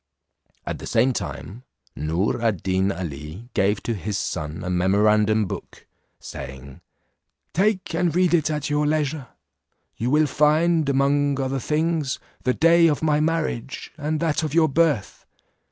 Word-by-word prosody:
At - - -4
the - - -7
same 125 +3 +2
time, 115 0 -6 0.3
Noor 85 +9 -1
ad 110 -7 0
Deen 95 +1 +1
Ali 85 - -7
gave 100 +2 +1
to 120 - -1
his 100 0 -3
son 80 -3 -4
a 90 - -3
memorandum 105 +4 +3
book, - - -8 0.3
saying, 65 0 -9 0.7
"Take 195 0 +1
and 170 -1 0
read 180 -1 +3
it 160 -3 +3
at 150 -2 -2
your 150 0 +1
leisure; 150 -2 -1 0.7
you 120 - -1
will 150 +3 +4
find, 155 +2 +2
among 140 +1 +2
other 135 0 -1
things, 155 +1 -1 0.3
the 125 - +3
day 165 +1 +5
of 150 -1 0
my 150 -1 +2
marriage, 155 -6 -2
and 155 0 -2
that 160 -3 +1
of 155 -1 -3
your 160 -2 +4
birth. 150 -7 0
140 Hz, 150 wpm, -23 LUFS, 100-155 Hz, 0.7 s, day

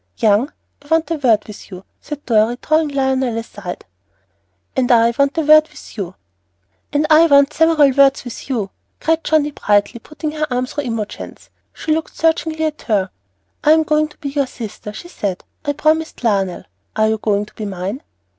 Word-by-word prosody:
"Young, 220 +6 +2 0.3
I 285 - -19
want 325 +1 +1
a - - +2
word 235 -8 +2
with 210 - -11
you," 185 -1 -9 0.2
said 290 -1 -8
Dorry, 225 +1 +2
drawing 310 0 +2
Lionel 265 -4 0
aside. 205 -5 -7 0.9
"And 255 -1 +1
I 235 0 +5
want 280 +3 +1
a - - +3
word 310 0 +6
with 300 - -13
you." 190 -4 -5 0.8
"And 295 +1 +1
I 320 +2 +7
want 280 0 +5
several 315 -3 +4
words 275 0 +4
with 245 +2 -9
you," 220 -7 -2 0.3
cried 325 +1 +1
Johnnie, 300 -2 +2
brightly, 210 -1 +1
putting 305 +5 -6
her 305 0 -2
arm 250 +1 0
through 290 +2 -5
Imogen's. 225 -3 -6 0.2
She 310 - -2
looked 320 +1 -3
searchingly 320 -1 +1
at 305 -1 -3
her. 195 -4 +1 0.5
"I'm 315 +1 +5
going 305 0 +1
to 300 - -20
be 280 - -5
your 280 -1 0
sister," 215 -4 -8
she 215 +11 -10
said; 200 - -4 0.2
"I've 290 0 -1
promised 315 -1 0
Lionel. 195 -5 0 0.3
Are 220 0 +3
you 220 0 0
going 205 -1 0
to - - -20
be 215 - -6
mine?" 195 +7 -4
275 Hz, 185 wpm, -18 LUFS, 215-305 Hz, 0.9 s, I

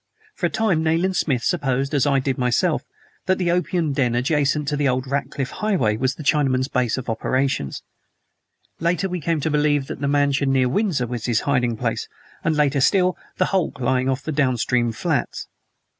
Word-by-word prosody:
For - - -1
a - - -5
time 195 -8 +1
Nayland 165 +4 +1
Smith 130 -9 0
supposed, 135 +1 0
as 145 -1 +2
I 140 -1 +3
did 135 0 -1
myself, 125 -1 +1 0.5
that 185 - +3
the 175 -2 +1
opium 175 -3 0
den 125 -4 +1
adjacent 145 +3 +1
to 150 - -1
the 145 -1 +1
old 130 +1 -1
Ratcliff 140 0 -3
Highway 180 - 0
was 130 +3 0
the 155 - -8
Chinaman's 135 -3 +2
base 125 -4 0
of 130 - -5
operations; 130 - -1 1.0
later 175 +4 0
we 180 -2 -4
came 165 +1 0
to 160 - -1
believe 145 -1 +2
that 135 - -7
the 140 - 0
mansion 140 -1 +2
near 130 -1 +3
Windsor 175 - 0
was 120 -1 -4
his 115 -3 +1
hiding 125 -5 0
place, - - -2 0.4
and 165 - +1
later 145 -2 +2
still, 185 +4 +3 0.2
the - - +3
hulk 180 -7 0
lying 130 +1 +1
off 135 +1 -1
the 155 - -3
downstream 125 -4 +1
flats. 110 - -2
140 Hz, 190 wpm, -22 LUFS, 130-155 Hz, 1.0 s, I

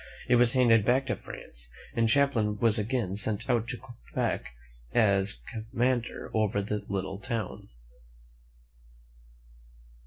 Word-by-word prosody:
It 120 - +5
was 120 -1 +4
handed 115 -4 +5
back 130 +5 +2
to 125 - -1
France, - - -10 0.2
and 115 -1 +2
Champlain 115 -5 +2
was 110 +1 +4
again 110 -3 -1
sent 105 +1 0
out 120 -3 +1
to 125 0 -3
Quebec 120 - -4 0.4
as 100 - +4
commander 120 +2 -2
over 110 -2 +1
the 105 +1 -3
little 95 0 -3
town. 115 -3 -5
110 Hz, 120 wpm, -28 LUFS, 100-120 Hz, 0.4 s, It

